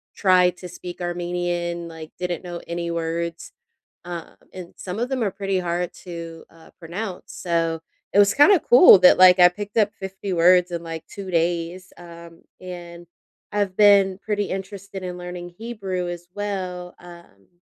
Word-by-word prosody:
tried 180 -2 +4
to 180 - -9
speak 180 0 -9
Armenian, 175 -1 -3
like 160 -1 -10
didn't 180 -2 -3
know 175 -1 -7
any 170 0 -3
words," 170 0 -4 0.5
uh, 175 -1 -7 0.2
and 180 -2 -9
some 185 +2 -6
of 240 +2 -1
them 260 -2 -2
are 205 - +1
pretty 195 0 -2
hard 175 0 -2
to, 165 -2 -9
uh, 165 -1 -18
pronounce, 180 +3 -6
so 165 -2 -1 0.3
it - - +2
was 205 0 +5
kind 290 +7 +6
of 370 - +3
cool 245 - +8
that, 180 0 +6
like, 185 0 +8
I 180 -1 +8
picked 205 +4 -8
up 210 -2 +3
50 190 -1 -6
words 180 +1 +4
in 170 -1 -3
like 165 -1 -7
2 195 -2 -8
days, 170 +2 -1
um, 170 -1 -13 0.2
and 175 -1 -9 0.5
I've 200 -3 -1
been 200 -2 +5
pretty 205 -1 -2
interested 195 0 -6
in 180 -1 -5
learning 180 0 -7
Hebrew 195 -6 -4
as 175 0 -7
well, 185 -3 -5
um 170 - -16
180 Hz, 165 wpm, -23 LUFS, 170-195 Hz, 0.5 s, cool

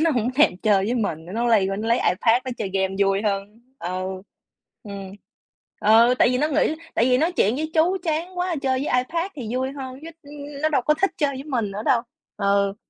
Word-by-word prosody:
nó 330 - +3
hổng 245 -2 0
thèm 285 -10 +4
chơi 195 -1 +2
với 235 +4 -1
mình, 165 -9 -2
cái 185 - -8
nó 235 +1 0
lây 215 -5 +4
qua 195 - -2
nó 220 +2 -3
lấy 235 - +4
iPad 225 +6 +2
nó 255 - -4
chơi 200 -4 -3
game 190 0 0
vui 195 +1 +2
hơn. 205 +2 -3 0.2
Ừ. 185 +1 -4 0.6
Ừm. 200 -3 -8 0.7
Ừ, 230 +3 +5
tại - - +5
vì 250 - 0
nó 300 +3 +1
nghĩ 310 +1 +1 0.2
tại 230 - +3
vì 250 0 +3
nói 330 +4 +1
chuyện 230 - +2
với 315 +1 -3
chú 340 +4 +3
chán 345 +2 -2
quá, 355 -2 -1
chơi 260 -1 +1
với 250 - +1
iPad 340 +6 -3
thì 235 -5 -6
vui 260 +1 -1
hơn 265 -1 -8
chứ, 330 - -8
ừm, 290 0 -14
ừm, 285 0 -9
nó 310 - +3
đâu 280 -5 +1
có 300 +4 +3
thích 390 - +4
chơi 290 -2 +1
với 270 +2 -7
mình 235 -9 -2
nữa 205 +2 -5
đâu. 235 - +4 0.4
Ừ, 200 -1 +1
240 Hz, 240 wpm, -23 LUFS, 200-290 Hz, 0.7 s, Ừ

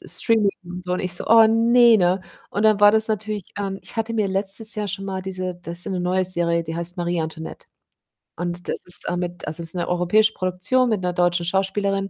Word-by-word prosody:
S - - -3
Streaming 220 -3 +3
und 180 +1 -8
so. 180 - -3
Und - - -2
ich 180 -1 -2
so: - - -5
„Oh, 225 0 +8
ne, 230 +1 +5
ne?“ 180 0 +2 0.3
Und 205 - -2
dann 215 -2 +4
war 205 0 +8
das 220 0 +2
natürlich, 215 -2 -3
ähm 195 -1 -3
ich - - -10
hatte 225 +1 -2
mir 215 -3 +1
letztes 195 +4 0
Jahr 210 -1 -3
schon 195 +1 -5
mal 190 -1 -4
diese 185 -1 -4
das 170 0 -6
ist - - -3
so - - -5
'ne 185 - -2
neue 185 +1 +1
Serie, 170 -2 0
die 160 0 -5
heißt 170 +2 -2
Marie 175 -1 -1
Antoinette. 160 0 -7 0.7
Und 175 0 -4
das - - -4
ist, 180 - -2
äh, 175 - -1
mit 175 -1 -5
also, 155 +2 -3
das 165 - -8
ist - - -11
'ne 175 - -2
europäische 180 +5 +3
Produktion 185 +8 0
mit 215 -4 0
'ner 180 -1 -1
deutschen 175 0 +1
Schauspielerin, 195 +2 0
185 Hz, 245 wpm, -22 LUFS, 175-210 Hz, 0.7 s, Oh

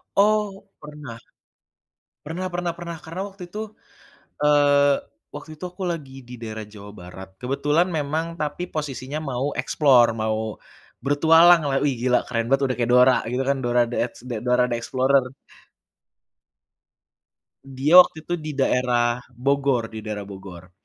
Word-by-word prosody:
Oh, 205 -1 +1 0.2
pernah. 150 -6 -10 1.1
Pernah 180 +4 -4
pernah 175 0 -2
pernah, 170 -1 -7
karena 165 +4 -7
waktu 190 -2 -10
itu, 205 +5 -8 0.8
eee, 145 -1 +3 0.3
waktu 145 +2 -9
itu 180 - -7
aku 185 +2 -8
lagi 135 -5 -8
di 125 0 -9
daerah 110 -1 -6
Jawa 100 -1 -11
Barat. 95 0 -11
Kebetulan 145 +6 +1
memang 160 +3 -3
tapi 150 +3 -3
posisinya 145 -2 -5
mau 130 +2 -1
explore, 130 -6 +4
mau 110 -1 -1 0.7
bertualang 165 +4 +6
lah, 135 -1 +1
"Wih 145 -2 +1
gila 125 0 +3
keren 115 -1 -2
banget 135 +1 +2
udah 130 -1 -1
kayak 120 0 0
Dora" 125 +1 +6 0.2
gitu 130 +2 -1
kan. 140 - +1
Dora 120 0 +2
The 120 - -4
Ex - - -27 0.3
Dora 125 0 +3
The 120 - -1
Explorer. 130 +2 +1 2.4
Dia 135 +6 +5
waktu 160 -3 +4
itu 175 - -4
di 155 -2 -6
daerah 125 -3 +1 0.2
Bogor, 135 -2 0
di 110 - -7
daerah 105 -1 -5
Bogor. 95 -3 -11
140 Hz, 145 wpm, -23 LUFS, 120-160 Hz, 2.4 s, bertualang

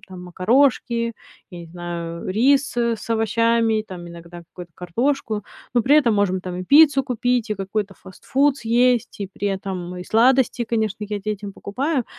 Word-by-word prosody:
там: 185 -4 -12
макарошки, 235 +5 +1 0.4
я 175 - -9
не 170 - -10
знаю, 170 0 -6
э, 185 - -1
рис, 270 +5 +2
э, 235 -1 +1
с 215 - -11
овощами, 225 0 +1
там, 175 -2 -8
иногда 170 0 -11
какую-то 175 0 -12
картошку. 215 - -2 0.3
Но 240 - +3
при 285 +6 +4
этом 240 -7 +3
можем 195 -2 +1
там 180 -1 -6
и 185 - -5
пиццу 285 - +6
купить, 245 -2 -1
и - - +1
какой-то 195 +1 -4
фастфуд 270 +11 -1
съесть, 240 0 +1
и 200 - -2
при 205 - -3
этом 190 -2 -5
и 180 - -7
сладости, 245 +2 +3
конечно, 220 -2 -2
я 210 -1 -3
детям 205 0 -5
покупаю. 265 +8 -2
215 Hz, 170 wpm, -21 LUFS, 185-245 Hz, 0.4 s, пиццу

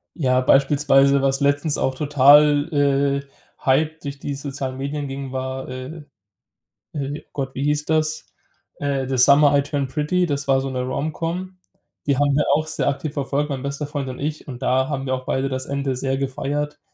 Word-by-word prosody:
Ja, 130 -5 +2
beispielsweise, 140 0 +4
was 135 0 +1
letztens 145 +1 +1
auch 130 0 0
total, 145 +1 +5
äh, 140 -1 +1 0.4
hype 155 +4 +2
durch 140 -1 -6
die 140 -1 -4
sozialen 135 -2 -5
Medien 140 +1 -3
ging, 135 -1 -6
war, 130 0 -4
äh, 130 +5 -7 0.9
äh, 145 0 -4
Gott, 135 -2 -4
wie 135 - -2
hieß 150 0 0
das? 155 0 0 0.5
Äh, 140 -2 -1
„The 135 - -1
Summer 140 +3 +6
I 140 - +2
Turn 140 -1 -2
Pretty“ 160 +6 0
Das 140 -2 -2
war 135 -1 +3
so 135 - -3
'ne 130 -1 -2
Romcom. 165 +7 -3 0.5
Die 140 -2 +1
haben 145 0 +2
wir 150 - +2
auch 155 +2 +1
sehr 155 - -2
aktiv 140 +1 -4
verfolgt, 145 +1 -1
mein 135 -2 -4
bester 140 +1 -4
Freund 145 -2 -4
und 125 - -7
ich. 150 +2 -4
Und 125 -1 -8
da 130 +1 +2
haben 135 -2 -3
wir 130 - +1
auch 130 0 -8
beide 135 +1 -1
das 130 0 -3
Ende 140 -2 -2
sehr 135 +1 -1
gefeiert. 140 +2 -3
140 Hz, 190 wpm, -22 LUFS, 135-150 Hz, 0.9 s, Summer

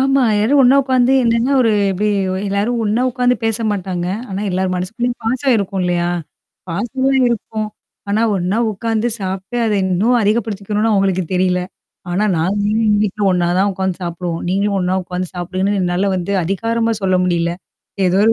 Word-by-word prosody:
ஆமா. 270 0 +3
எல்லாரும் 255 +7 +3
ஒன்னா 260 +2 +6
உக்காந்து 260 -1 +2
என்னன்னா 230 +3 +2
ஒரு 225 - +3 0.2
எப்பிடி 205 +3 0 0.4
எல்லாரும் 210 +5 0
ஒன்னா 220 +4 +1
உக்காந்து 250 0 +2
பேச 225 -1 +1
மாட்டாங்க, 185 -3 -3 0.2
ஆனா 195 +1 -4
எல்லார் 185 0 -1
மனசுக்குள்ளயும் 230 +7 -3
பாசம் 255 +2 +1
இருக்கும் 195 -2 -2
இல்லயா! 175 -1 0 0.6
பாசம் 230 +10 -3
எல்லாம் 265 -1 +3
இருக்கும் 215 -2 -3 0.4
ஆனா 215 +3 +1
ஒன்னா 185 +4 -1
உக்காந்து 225 +3 -1
சாப்பிட்டு, 190 +4 -4
அத 210 - +1
இன்னும் 200 +7 +2
அதிகப்படுத்திக்கணுன்னு 210 0 0
அவுங்களுக்கு 190 -2 +1
தெரியல. 180 0 +2 0.5
ஆனா 195 +4 +1
"நாங்க 190 +6 0
எல்லாம் 215 -1 +2
வீட்ல 210 +1 -3
ஒன்னா 175 -1 +1
தான் 200 +1 +2
உக்காந்து 190 -1 -2
சாப்பிடுவோம். 170 -1 -4
நீங்களும் 200 +1 +1
ஒன்னா 180 +1 0
உக்காந்து 180 0 -4
சாப்பிடுங்கன்னு" 185 +3 -1
என்னால 180 +3 0
வந்து 180 +3 -3
அதிகாரமா 230 +5 0
சொல்ல 185 -1 +2
முடியல. 170 -1 0 0.5
ஏதோ 180 +2 +2
ஒரு 225 - +5
200 Hz, 160 wpm, -17 LUFS, 185-230 Hz, 0.6 s, ஒன்னா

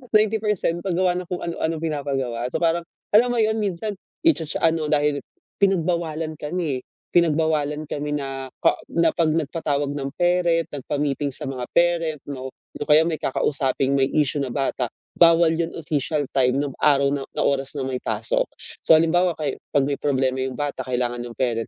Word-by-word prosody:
90% 210 -5 +2
Pag-gawa 180 -1 +1
ng 180 - -6
kung, 180 - -3
ano-ano, 165 -1 -2
pinapagawa. 135 -6 -2
So, - - 0
parang 170 0 +1 0.3
alam 225 +4 +6
mo 240 - -1
'yun, 220 0 +2
minsan. 205 0 -2 0.3
I 330 - +7
cha-cha 155 -2 -4
sa 165 - +5
ano 155 -2 -2
dahil 145 -1 +2 0.4
pinag-bawalan 170 -4 +1
kami. 150 -4 -2 0.3
Pinagbawalan 155 -2 +2
kami 150 0 -2
na 135 -1 -5
ka - - +4 0.4
pag 165 -2 +2
nag 160 -2 0
patawag 145 -3 -1
ng 140 -1 -3
parent, 175 -2 +2
nagpa-meeting 145 +1 -1
sa - - -5
mga 130 -2 -4
parent, 170 -3 +2
'no, 130 -2 -5 0.3
'yung - - -4
kaya 150 +1 +7
may 160 -2 -1
kakausaping 135 0 0
may 135 0 +2
issue 145 -1 +1
na 130 - -3
bata. 135 -3 -1 0.3
Bawal 165 -1 +6
'yun, 165 0 -2
official 150 -1 -1
time 130 -1 +3
'nung 140 -2 -4
araw 140 -2 +4
na 140 -1 -2
na - - +2
oras 135 -1 0
na 135 - -2
may 130 - -2
pasok. - - 0 0.4
So - - +6
halimbawa, 175 +2 +3
ka 150 -2 -1 0.2
'pag 140 -1 +4
may 140 - -1
problema 130 -2 +1
'yung 130 -1 -3
bata 145 -2 -3
kailangan 120 -1 -1
'yung 120 -1 -10
parent, 115 -3 0
150 Hz, 175 wpm, -23 LUFS, 135-170 Hz, 0.4 s, I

